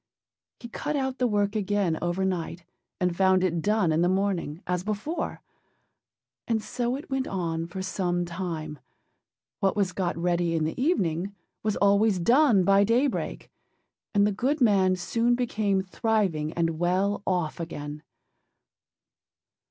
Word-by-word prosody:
He 235 - -8
cut 295 +6 -3
out 265 -2 -2
the 250 - +3
work 205 -1 0
again 200 -5 0
overnight 175 -1 -2 0.3
and 180 -1 0
found 190 0 +3
it 170 -3 0
done 210 -3 +2
in 155 +1 +2
the 175 - +3
morning, 185 -4 -1
as 180 0 -1
before; 215 - -3 1.0
and 225 -2 +1
so 245 +3 -2
it 275 0 -9
went 265 -1 -1
on 165 -3 -2
for 190 +2 -5
some 175 -2 -1
time: 165 -4 -5 0.8
what 195 +1 +1
was 200 -3 +1
got 175 -2 -2
ready 170 -1 +1
in 160 - +1
the 160 +10 -2
evening 195 - 0 0.3
was 215 -1 0
always 200 0 +3
done 235 - +4
by 195 +2 +5
daybreak, 240 +6 0 0.6
and 200 0 +5
the 210 - +2
good 265 +10 0
man 195 -6 +4
soon 230 +6 +1
became 210 -5 0
thriving 190 -6 0
and 165 -2 -1
well 190 +4 +1
off 175 -5 -1
again. 150 -3 -6
190 Hz, 145 wpm, -27 LUFS, 175-215 Hz, 1.0 s, by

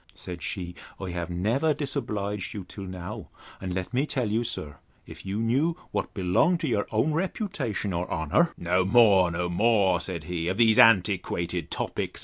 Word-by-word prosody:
Said 90 -2 -8
she, 90 +1 -4 0.3
I 95 -2 -4
have 85 0 -4
never 115 - +1
disobliged 105 - -3
you 100 - -5
till 100 +1 -8
now; 95 +3 -7 0.3
and 95 -1 -4
let 95 +5 -4
me 135 +4 +1
tell 125 -8 -1
you, 115 +2 +1
sir, 75 -11 -5 0.3
if - - -11
you 95 +2 -2
knew 135 +10 +1
what - - -3
belonged 100 - +2
to 155 - -1
your 105 -5 0
own 115 +8 +1
reputation 160 - -2
or 85 +1 -2
honour—No 90 - +1
more, 95 -3 +5
no 85 +1 -2
more, 95 -1 +3
said 85 -2 -5
he, 85 0 -3
of 95 +2 -1
these 115 -2 +5
antiquated 90 -5 +3
topics. - - -3
100 Hz, 170 wpm, -27 LUFS, 90-120 Hz, 0.3 s, more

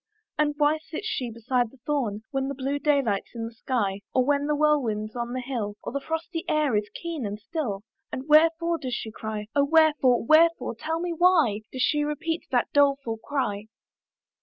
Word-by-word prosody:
"And 295 -1 +1
why 300 +1 +3
sits 325 +5 -7
she 255 - -2
beside 240 +1 -1
the 270 - -20
thorn 235 -8 -1
"When 270 -1 -1
the 280 - -4
blue 275 +2 -2
day 285 -1 +3
light's 205 -1 -2
in 225 -1 -3
the 230 - -7
sky, 210 -5 -2
"Or 255 -1 +4
when 285 +1 +1
the 300 - +1
whirlwind's 250 -8 +1
on 240 0 -3
the 255 - -2
hill, 235 -5 -3
"Or 280 - -3
frosty 325 +3 -4
air 300 -6 +2
is 210 0 0
keen 335 -5 -4
and 205 0 -4
still, 220 - -4 0.3
"And 260 +3 -5
wherefore 330 +2 +4
does 255 -3 -3
she 220 - -5
cry? 215 -1 -5
"Oh 285 - +4
wherefore? 295 -6 +4
wherefore? 330 +2 +4
tell 315 +8 -3
me 350 0 -2
why 320 - +3
"Does 255 -1 -1
she 295 +3 +2
repeat 320 +3 -3
that 245 -2 0
doleful 275 -5 +2
cry?" 220 -5 -3
275 Hz, 190 wpm, -26 LUFS, 230-305 Hz, 0.3 s, Or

